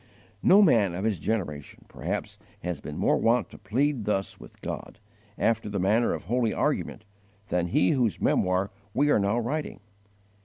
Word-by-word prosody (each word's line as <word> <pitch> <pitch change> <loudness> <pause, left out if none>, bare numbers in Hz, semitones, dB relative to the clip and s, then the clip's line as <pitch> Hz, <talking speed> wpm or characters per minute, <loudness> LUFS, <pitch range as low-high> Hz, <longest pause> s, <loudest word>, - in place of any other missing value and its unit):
No 200 +3 +7
man 105 - +3
of 95 - -4
his 105 -6 0
generation, 75 -7 -4
perhaps, - - -5 0.2
has 90 -5 -4
been 75 - -7
more - - +2
wont 115 -3 +2
to - - -12
plead 130 0 0
thus 100 -2 -1
with - - -14
God, - - -6 0.4
after 115 -2 +1
the 100 -1 -2
manner 105 +6 +2
of - - -8
holy 115 +4 0
argument, 110 - -1 0.4
than 90 -1 0
he 90 +1 +3
whose 120 - +1
memoir 95 +1 +1 0.2
we 145 +2 +3
are - - +4
now 100 +3 +1
writing. 140 +6 -3
105 Hz, 165 wpm, -27 LUFS, 95-120 Hz, 0.4 s, No